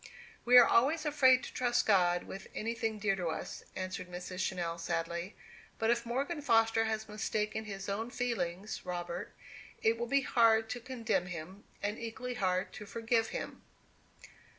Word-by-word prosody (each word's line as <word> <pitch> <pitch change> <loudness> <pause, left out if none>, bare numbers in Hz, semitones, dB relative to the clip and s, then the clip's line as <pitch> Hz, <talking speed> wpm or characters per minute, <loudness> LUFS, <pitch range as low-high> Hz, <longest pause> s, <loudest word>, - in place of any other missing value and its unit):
"We 250 +1 +8
are 245 - +10
always 305 +7 +3
afraid 270 -3 +5
to - - -7
trust 245 -1 +1
God 175 -4 +3
with 195 0 -8
anything 225 0 -2
dear 200 -1 +1
to 175 -2 -2
us," 160 - -4
answered 185 -1 -4
Mrs. 180 +1 -6
Channell, 175 -3 -2
sadly. 170 +3 -3 0.4
"But 225 +1 +2
if 235 0 0
Morgan 280 +6 -2
Foster 225 -4 +3
has 220 0 -2
mistaken 215 0 -2
his 195 -2 -6
own 215 +4 -2
feelings, 210 -6 -3
Robert, 175 +1 -4 0.5
it 225 +1 +3
will 235 - -2
be 275 +3 +3
hard 225 -3 +3
to 245 - -3
condemn 225 -7 -1
him, 180 +3 -8 0.2
and 205 +2 -2
equally 250 +2 -5
hard 185 -5 0
to 210 - -9
forgive 225 +2 +1
him." - - -6
220 Hz, 160 wpm, -33 LUFS, 185-235 Hz, 0.5 s, are